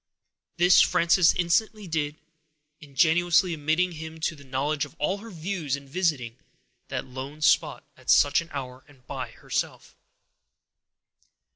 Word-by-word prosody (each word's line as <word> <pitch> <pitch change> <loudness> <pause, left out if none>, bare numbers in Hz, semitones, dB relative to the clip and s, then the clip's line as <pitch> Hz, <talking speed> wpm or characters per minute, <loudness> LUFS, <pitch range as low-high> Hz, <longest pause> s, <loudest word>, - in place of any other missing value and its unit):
This 180 +1 +6
Frances 170 0 +4
instantly 205 +4 0
did, 150 -3 -2 0.6
ingenuously 170 +4 +2
admitting 160 +4 0
him 160 0 -8
to 160 - -1
a - - -13
knowledge 140 +3 -1
of 145 - -8
all 185 +7 -1
her 230 +2 -10
views 170 -5 -3
in 140 -1 -11
visiting 135 -7 -1 0.5
that - - -4
lone 135 +4 -8
spot - - +2
at - - -14
such 145 +3 +5
an 170 - -12
hour, 130 -2 -7
and 135 -3 -22
by - - -5
herself. - - -5
160 Hz, 135 wpm, -26 LUFS, 140-175 Hz, 0.6 s, This